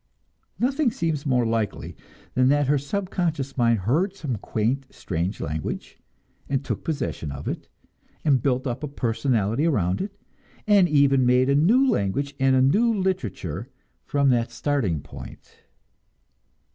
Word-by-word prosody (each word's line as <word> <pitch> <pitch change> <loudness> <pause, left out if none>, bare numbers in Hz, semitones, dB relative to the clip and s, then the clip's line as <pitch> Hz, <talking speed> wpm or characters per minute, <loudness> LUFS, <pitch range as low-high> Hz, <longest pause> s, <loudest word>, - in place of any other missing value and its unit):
Nothing 270 +2 +1
seems 160 - -2
more 125 -3 +2
likely 115 -2 -2 0.4
than 130 0 +3
that 145 +1 +3
her 145 +1 +2
subconscious 160 -4 -2
mind 115 -4 +2
heard 165 - +1
some 140 - -3
quaint, 120 +7 -1
strange 90 +2 -3
language, 75 0 -5 0.5
and 135 0 -1
took - - -3
possession 140 - -3
of 70 +1 -7
it, - - -4 0.6
and 135 -5 +4
built 130 +1 0
up 125 0 -3
a 150 - -3
personality 120 0 0
around 95 - +1
it, 200 +1 -6 0.5
and 200 -4 +5
even 140 -3 +4
made 125 +1 +4
a 140 - +4
new 225 - +4
language 140 - 0
and 135 0 +4
a 130 - +4
new 215 - +4
literature 130 - -2 0.3
from 140 -1 +2
that 120 -2 +1
starting 120 - -1
point. - - -12
135 Hz, 145 wpm, -24 LUFS, 115-155 Hz, 0.6 s, and